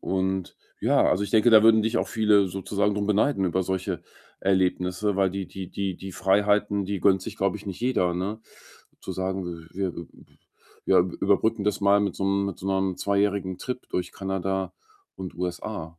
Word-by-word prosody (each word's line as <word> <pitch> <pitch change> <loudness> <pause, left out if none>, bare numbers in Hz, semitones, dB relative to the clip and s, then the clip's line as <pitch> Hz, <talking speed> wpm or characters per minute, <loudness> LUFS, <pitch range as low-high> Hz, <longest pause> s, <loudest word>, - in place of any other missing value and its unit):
und 95 -1 -2 0.2
ja, - - +3
also, 95 - +2
ich 100 - -6
denke, 110 +2 +4
da 110 -1 +8
würden 110 -1 +6
dich 115 +2 0
auch - - -2
viele 105 -3 +3
sozusagen 100 +2 -1
drum 100 0 -1
beneiden 105 +1 +2
über 95 +1 +1
solche 95 -1 -3 0.4
Erlebnisse, 95 +1 +1
weil 95 -1 +2
die 95 -1 -4
die 95 -2 -8
die 95 -2 -3
die 95 0 -8
Freiheiten, 100 +2 +2
die 100 -1 -3
gönnt 95 0 +3
sich, - - -7
glaube 100 0 0
ich, 105 - -13
nicht 95 +1 -6
jeder, 90 -9 +1
ne? 100 +5 -3 0.6
Zu 95 - -6
sagen, 95 +1 -3 0.3
wir, 95 0 -1
äh, - - -3
b 85 -1 -8 0.8
wir 95 - +5
überbrücken 100 +4 +1
das 105 -1 0
mal 100 0 +4
mit 100 - -1
so 95 - -2
'nem 100 0 +1
mit 100 - -5
so 95 - -7
'nem 95 -1 0
zweijährigen 100 -2 0
Trip 125 +3 -6
durch 90 0 -2
Kanada 95 0 -3 0.4
und 95 -1 -7
USA, 90 -2 -5
95 Hz, 190 wpm, -25 LUFS, 95-105 Hz, 0.8 s, da